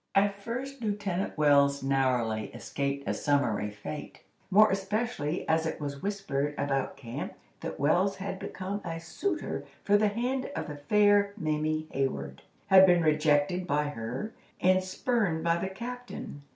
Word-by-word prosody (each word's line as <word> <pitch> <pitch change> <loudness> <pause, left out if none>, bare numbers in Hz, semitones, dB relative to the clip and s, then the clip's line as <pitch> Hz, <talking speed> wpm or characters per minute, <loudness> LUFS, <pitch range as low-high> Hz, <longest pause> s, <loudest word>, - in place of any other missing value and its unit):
At 200 0 +2
first 255 +5 -5
Lieutenant 205 -5 -2
Wells 140 -2 +4
narrowly 125 -5 +1
escaped 140 0 -3
a - - +1
summary 125 -8 +1
fate, 105 +9 -8 0.3
more 210 +2 +6
especially 195 -4 -2
as 160 0 +2
it - - -4
was 140 -2 -5
whispered 150 -8 -2
about 135 -2 -1
camp 120 -4 -6 0.2
that - - -6
Wells 175 +8 +3
had 190 -1 -5
become 195 +2 -4
a 165 -1 -4
suitor 315 - -3 0.2
for 205 0 +4
the 210 +1 +3
hand 245 +5 -1
of - - -2
the 145 - -6
fair 205 +6 +4
Mamie 155 -2 -1
Hayward, 70 - -2 0.2
had 190 0 +8
been 175 -2 +5
rejected 155 +3 +2
by 150 0 +1
her, 125 - -5 0.3
and 185 +1 +4
spurned 185 -4 0
by 170 0 +2
the 190 +2 -2
captain. 240 -7 -7
165 Hz, 150 wpm, -29 LUFS, 140-200 Hz, 0.3 s, had